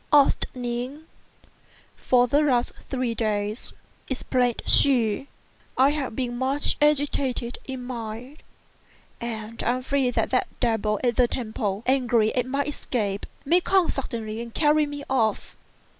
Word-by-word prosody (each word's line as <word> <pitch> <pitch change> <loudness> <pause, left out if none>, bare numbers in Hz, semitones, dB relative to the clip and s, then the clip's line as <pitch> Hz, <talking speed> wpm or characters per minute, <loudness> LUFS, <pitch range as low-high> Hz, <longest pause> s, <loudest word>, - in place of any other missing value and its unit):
asked 285 -2 +5
Ning. 250 +4 -4 0.9
"For 245 -1 +3
the 285 +5 +3
last 255 -5 +2 0.2
three 255 -3 -1
days," 215 0 -2 0.4
explained 250 -2 0
she, 250 -2 +3 0.5
"I 265 +2 +5
have 280 -6 -3
been 245 -2 -2
much 270 +2 +4
agitated 280 -4 +1
in 260 -2 -6
mind; 245 +3 -7 0.8
and 225 -1 -5
I 250 +1 0
fear 270 -1 +1
that - - 0
the 255 - +3 0.2
devil 220 -3 0
at 240 -2 +1
the 250 -1 +5
temple, 215 -4 -3
angry 245 -4 +2
at 250 -1 0
my 275 +2 0
escape, 215 -9 -3 0.2
may 345 +6 +4
come 375 -1 +2
suddenly 225 -4 -4
and 235 0 -7
carry 300 +2 +3
me 290 0 -6
off." 225 -5 0
250 Hz, 135 wpm, -25 LUFS, 230-275 Hz, 0.9 s, asked